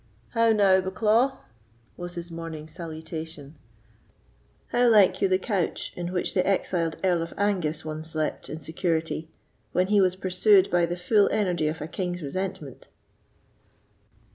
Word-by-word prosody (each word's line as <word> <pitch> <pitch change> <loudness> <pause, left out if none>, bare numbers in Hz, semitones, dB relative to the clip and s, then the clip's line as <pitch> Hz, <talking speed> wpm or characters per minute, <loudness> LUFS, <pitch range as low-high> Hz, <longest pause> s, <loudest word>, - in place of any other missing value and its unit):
"How 230 0 +3
now, 195 -3 +4
Bucklaw?" 220 +8 +2 0.6
was 175 0 -6
his 170 0 -6
morning's 165 -2 -7
salutation—"how 160 - -6
like 195 -4 +5
you - - +4
the 185 0 +3
couch 190 -3 -2
in 175 0 -4
which 180 -1 -1
the 185 - +2
exiled 175 -4 0
Earl 180 -3 +2
of 165 - -6
Angus 175 -7 0
once 155 +1 -6
slept 155 -1 -3
in 155 - -5
security, 160 0 -2 0.4
when 180 +1 +3
he 205 -1 +5
was 185 -1 +2
pursued 190 +1 +3
by 175 -1 +3
the 175 +1 -3
full 205 +3 +3
energy 175 -7 0
of 155 +1 -3
a 155 - -4
king's 180 0 -4
resentment?" 150 -3 -5
175 Hz, 140 wpm, -26 LUFS, 160-190 Hz, 0.6 s, like